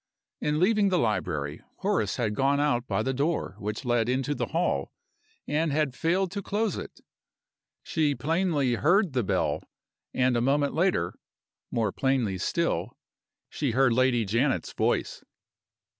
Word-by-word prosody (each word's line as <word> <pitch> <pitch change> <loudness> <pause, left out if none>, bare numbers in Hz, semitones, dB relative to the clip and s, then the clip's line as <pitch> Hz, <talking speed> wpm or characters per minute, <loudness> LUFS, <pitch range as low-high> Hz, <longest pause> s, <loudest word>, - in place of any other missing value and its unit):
In 150 0 0
leaving 205 +2 +3
the 185 - +2
library, 75 - -1 0.2
Horace 105 -4 0
had 110 -4 -1
gone 140 +5 +2
out 130 -4 +1
by - - 0
the 130 - -1
door 140 - -1
which 105 +5 -4
led 120 -1 +1
into 135 +3 0
the - - -2
hall, 160 - -1 0.6
and 155 +1 +1
had 145 -2 +1
failed 175 +6 0
to 200 - -3
close 210 +3 -1
it. - - -8 0.8
She 150 -3 0
plainly 155 -5 +1
heard 175 - +3
the 125 - +2
bell 95 -1 0 0.5
and 125 -1 +2
a 120 - +2
moment 140 +3 +2
later 160 - +1 0.6
(more 110 -4 0
plainly 125 -8 0
still) - - -1 0.5
she 140 -6 -2
heard 130 -1 +4
Lady 125 -2 +2
Janet's 120 +7 0
voice! - - -1
135 Hz, 145 wpm, -27 LUFS, 115-160 Hz, 0.8 s, heard